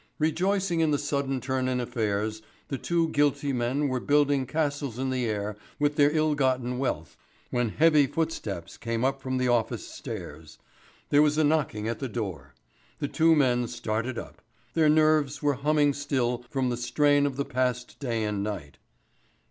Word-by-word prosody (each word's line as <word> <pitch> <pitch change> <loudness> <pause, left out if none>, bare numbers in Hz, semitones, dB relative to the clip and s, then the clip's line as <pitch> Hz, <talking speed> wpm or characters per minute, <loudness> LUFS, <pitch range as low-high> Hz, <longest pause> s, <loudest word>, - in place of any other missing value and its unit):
Rejoicing 175 +3 +1
in 160 -1 +3
the 145 - +2
sudden 140 -2 -1
turn 130 0 -1
in 130 -1 0
affairs, 110 -3 -2 0.3
the 135 - -3
two 170 -1 +1
guilty 145 -1 +1
men 130 +4 0
were 130 -2 -1
building 145 -1 +2
castles 145 -5 -2
in 130 0 -1
the 125 -2 0
air 105 -1 -2 0.2
with 145 0 +1
their 145 -1 +5
ill 155 0 +2
gotten 130 -3 0
wealth, 80 - -2 0.4
when 120 -2 +1
heavy 150 +2 +4
footsteps 120 - -3
came 115 +1 -2
up 135 0 0
from 130 0 -2
the 130 0 +1
office 120 -3 0
stairs; 75 +1 -8 0.5
there 145 - +5
was 150 0 +3
a 155 - +4
knocking 145 -8 +1
at 115 -1 -3
the 135 - -3
door. 90 - -5 0.4
The 145 - -2
two 165 +2 +4
men 125 -4 +2
started 115 +3 -3
up. - - -8 0.3
Their 155 0 +4
nerves 155 -2 +3
were 145 -1 +3
humming 145 -1 +3
still 130 -4 -1
from 130 -2 0
the 120 - -2
strain 145 +3 +3
of 135 - -4
the 140 +1 -2
past 125 -1 -2
day 115 -5 -1
and 105 -2 -1
night. 85 -10 -5
135 Hz, 175 wpm, -27 LUFS, 120-145 Hz, 0.5 s, their